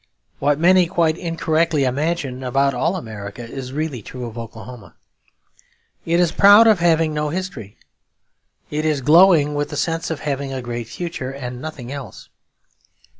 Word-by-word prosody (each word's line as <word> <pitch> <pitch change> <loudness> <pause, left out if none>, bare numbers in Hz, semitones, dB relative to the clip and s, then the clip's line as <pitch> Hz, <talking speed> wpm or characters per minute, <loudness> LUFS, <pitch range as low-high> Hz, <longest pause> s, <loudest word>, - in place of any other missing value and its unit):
What 145 +1 +2
many, 180 +2 +4
quite 165 -3 +1
incorrectly, 165 -3 0
imagine 135 0 -2
about 135 +2 +1
all 165 +9 0
America 110 - -7
is 130 +1 -7
really 145 -4 -3
true 125 +4 -8
of 115 -2 -8
Oklahoma. 115 -4 -10 1.1
It 170 +1 +2
is 175 -2 +3
proud 205 +3 +7
of 215 -5 +5
having 165 -2 +2
no 150 0 -1
history. 170 - -6 0.9
It 150 +1 -2
is 155 -3 0
glowing 155 0 +5
with 145 0 -2
the 145 - -6
sense 165 +2 -2
of 160 -3 -4
having 140 -2 -3
a 135 - -4
great 120 -2 -5
future 170 -2 -5
and 125 -2 -7
nothing 140 -6 -7
else. 140 -2 -9
145 Hz, 155 wpm, -20 LUFS, 125-165 Hz, 1.1 s, proud